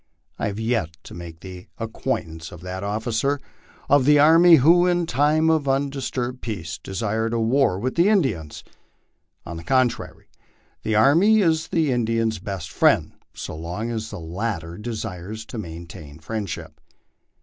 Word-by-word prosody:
I - - 0
have 100 +1 -4
yet 110 -9 -1
to - - -11
make 85 -1 -9
the 90 -1 -10
acquaintance 80 0 -4
of 85 - -11
that 90 +1 -6
officer 110 +7 -1 0.5
of 140 -2 +4
the 150 +1 +6
army 165 +4 +7
who, 170 +6 +5
in 175 -1 +2
time 150 +3 +2
of 155 -3 +1
undisturbed 135 -2 -2
peace, 90 -7 -5
desired 110 +5 -2
a - - 0
war 115 -3 +2
with 125 +6 -2
the 170 +4 +3
Indians. 125 - 0 0.8
On 85 - -6
the 85 - -8
contrary, 130 +5 0 0.5
the 110 - -1
army 170 - +5
is 160 -3 +2
the 160 -4 +1
Indian's 115 -2 0
best 95 -5 -6
friend, - - +3 0.2
so - - -6
long 90 +9 -4
as 110 -1 -4
the 105 - -7
latter 85 0 -4
de 115 +1 -4
sires 105 +1 -6
to 115 - -7
maintain 80 -5 -9
friendship. 100 +2 -6
110 Hz, 155 wpm, -23 LUFS, 90-140 Hz, 0.8 s, army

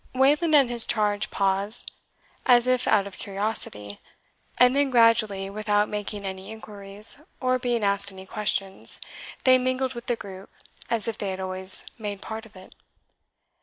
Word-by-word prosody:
Wayland 295 +5 +2
and 275 -3 +5
his 240 -1 +2
charge 210 -2 -1
paused, 195 +2 -1 0.6
as 245 -1 +5
if 255 0 0
out 200 -2 +2
of 200 -2 -11
curiosity, 195 - -4 0.6
and 250 +1 +4
then 285 -1 +1
gradually, 230 -5 +2
without 210 +1 -1
making 205 -1 -6
any 190 0 -7
inquiries, 210 +2 -1 0.2
or 255 0 0
being 240 -3 -2
asked 200 0 0
any 190 0 -12
questions, 195 -2 -1 0.4
they 255 0 +4
mingled 255 +1 -2
with 240 0 -10
the 240 - 0
group, 195 -3 -11 0.4
as 230 -2 0
if 225 -1 -5
they 200 - -4
had 190 0 -6
always 185 0 +7
made 205 -2 -6
part 220 +2 -8
of 210 - -26
it. 185 0 -15
210 Hz, 160 wpm, -24 LUFS, 195-245 Hz, 0.6 s, always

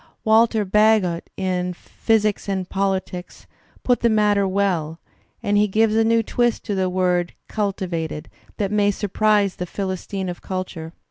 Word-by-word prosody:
Walter 220 -1 +3
Bagehot 205 -4 +2
in 180 -1 -1
"Physics 215 +1 0
and 190 -2 -2
PoUtics" 190 -2 -3 0.4
puts 245 -1 +2
the 235 - +3
matter 210 -2 +3
well, 180 -5 -1 0.4
and 205 0 +1
he 210 +1 +4
gives 215 +2 +2
a 225 - +4
new 230 0 +3
twist 240 +1 0
to 210 - -2
the 190 -1 0
word 180 -1 0
"cultL 200 -3 -2
vated" 160 -3 -4 0.3
that 200 -2 -1
may 205 -1 +3
surprise 205 0 +1
the 180 -2 -4
"Philistines 190 0 -4
of 175 - -10
culture." 185 -3 -5
195 Hz, 150 wpm, -22 LUFS, 180-215 Hz, 0.4 s, he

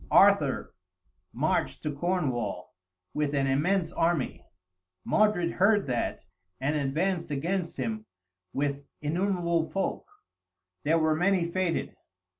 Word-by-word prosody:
Arthur - - +4 0.6
marched 145 +7 0
to 150 -2 -2
Cornwall, 135 - -1 0.4
with 150 -1 0
an 135 -1 +2
immense 165 +6 +1
army. 165 -5 0 0.6
Modred 210 -6 +3
heard 205 +2 +3
that, 125 -7 -2 0.3
and 140 +4 0
advanced 165 +5 0
against 170 +5 -2
him 220 -1 -3 0.4
with 140 0 -2 0.2
innumerable 170 0 0
folk, 195 - -2 0.8
there 160 +3 +3
were 155 -1 +3
many 180 +1 +2
fated! 170 0 -1
165 Hz, 105 wpm, -28 LUFS, 145-185 Hz, 0.8 s, Arthur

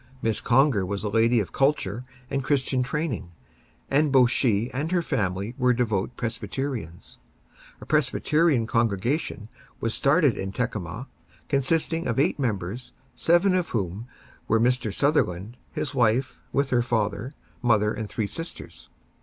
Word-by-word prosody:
Miss 110 -2 0
Conger 125 -4 +3
was 100 +2 -3
a 105 - -1
lady 115 +2 +3
of 100 - -3
culture 125 -5 0 0.3
and 135 -1 -1
Christian 135 -2 +1
training, 135 - -2 0.6
and 145 +1 +2
both 125 -2 +5
she 115 -2 +1
and 145 +6 -3
her 175 -2 +2
family 100 - -2
were 125 -1 +4
devoted 115 -3 -1
Presbyterians. 115 - -5 0.6
A - - -10
Presbyterian 155 -1 +2
congregation 115 - -1 0.3
was 115 -1 -1
started 140 -2 +3
in 95 0 -4
Tekamah, 110 -2 -3 0.4
consisting 160 +4 +1
of 115 - -1
eight 140 - +2
members, 110 -1 -3 0.2
seven 175 +3 +3
of 180 -2 0
whom 100 +1 -3 0.4
were 115 - +3
Mr. 120 -1 +1
Sutherland, 110 - 0 0.2
his 145 - -3
wife, 125 0 +1
with 140 0 0
her 120 -1 +3
father, 120 +2 -1 0.3
mother 110 -4 +3
and 110 -2 -5
three 110 - -2
sisters. 100 - -7
120 Hz, 140 wpm, -25 LUFS, 105-140 Hz, 0.6 s, both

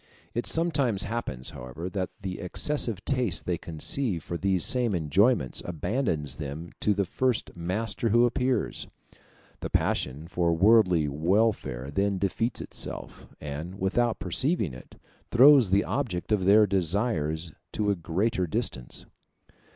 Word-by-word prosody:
It 120 - -1
sometimes 140 - +2
happens, 100 - -3
however, 65 +8 -7
that 95 -1 -2
the 95 -1 -4
excessive 115 - 0
taste 125 - 0
they 90 -2 -1
conceive 85 - -2
for 85 - -5
these 95 0 +2
same 120 -5 +2
enjoyments 85 - +2
abandons 85 - -2
them 75 +3 -6
to 105 - +1
the 100 0 +1
first 125 +5 -1
master 105 +7 -2
who 120 +3 +5
appears. 125 +1 -1 0.7
The - - -5
passion 70 +5 -1
for 85 -1 +1
worldly 90 -4 +4
welfare 80 - 0
then 100 +4 0
defeats 110 +5 -1
itself, - - -7
and, 75 +5 -6
without 115 +5 +1
perceiving 100 - 0
it, 65 - -13 0.3
throws 130 -2 +7
the 100 +2 +3
object 110 -10 -3
of 100 -4 +2
their 105 +2 +6
desires 85 -4 -1 0.2
to 105 -1 +1
a - - +1
greater 95 +3 -1
distance. 65 -5 -3
95 Hz, 135 wpm, -27 LUFS, 85-115 Hz, 0.7 s, throws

